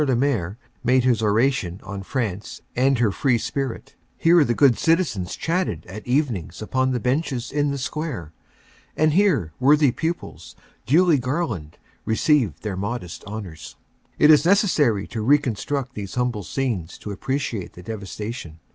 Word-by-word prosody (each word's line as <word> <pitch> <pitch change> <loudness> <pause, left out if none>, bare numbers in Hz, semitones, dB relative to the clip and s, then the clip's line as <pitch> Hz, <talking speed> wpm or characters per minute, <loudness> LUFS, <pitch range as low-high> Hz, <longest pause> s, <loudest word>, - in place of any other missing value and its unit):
le 135 -4 +2
Maire 115 -7 0 0.3
made 125 +1 +3
his 120 -4 +2
oration 105 -4 +1
on 100 0 -6
France 105 -3 -3 0.2
and 130 +2 +3
her 115 -3 +2
free 130 +2 +2
spirit; 130 +2 -4 0.2
here 165 -1 +5
the 120 -4 0
good 135 -3 +5
citizens 145 - 0
chatted 165 - -1
at 105 +5 -9
evenings 120 - -1
upon 130 +4 0
the 125 -1 0
benches 125 -1 -1
in 145 +1 +1
the 140 - -2
square; 130 - -4 0.6
and 155 0 +3
here 160 - +2
worthy 145 0 +5
pupils, 165 +6 -5 0.3
duly 160 +2 +4
garlanded, 125 - -3 0.3
received 115 - +1
their 105 -3 -3
modest 100 -2 -5
honors. 100 -6 -8 0.4
It 150 - +7
is 150 -1 +6
necessary 165 - +3
to 110 - -5
reconstruct 135 0 +1
these 100 -4 -6
humble 125 -4 0
scenes 95 - -3
to 105 -1 -6
appre 130 +7 -2
ciate 115 -9 -4
the 90 - -12
devastation. 105 -4 -6
125 Hz, 150 wpm, -23 LUFS, 105-145 Hz, 0.6 s, It